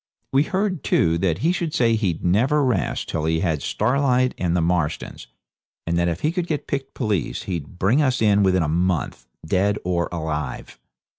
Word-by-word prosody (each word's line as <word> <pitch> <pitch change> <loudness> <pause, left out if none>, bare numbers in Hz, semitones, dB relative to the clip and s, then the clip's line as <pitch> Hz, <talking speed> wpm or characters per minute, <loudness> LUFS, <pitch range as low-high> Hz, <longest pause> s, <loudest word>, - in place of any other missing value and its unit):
We 135 - +5
heard, 185 +1 -1
too, 85 0 +2
that 85 -3 +1
he 170 - +4
should 170 -4 -2
say 115 -2 +3
he'd 95 -8 -1
never 130 +11 +3
rest 125 - -1
till 80 -1 -2
he 80 0 +1
had 80 -5 0
Starlight 130 -1 +1
and 90 -1 0
the - - +2
Marstons, 80 -7 -1 0.6
and 85 - -1
that 85 - +2
if 85 0 -2
he 155 - +1
could 175 0 -2
get 150 -4 -2
picked 135 -1 -4
police 105 - -2
he'd 85 -3 -5
bring 110 +11 +3
us 130 -4 +1
in 105 -2 +4
within 95 -3 +3
a - - -1
month, 85 -6 -1 0.2
dead 100 +5 +1
or 85 -1 0
alive. 80 -3 -4
95 Hz, 190 wpm, -22 LUFS, 85-130 Hz, 0.6 s, We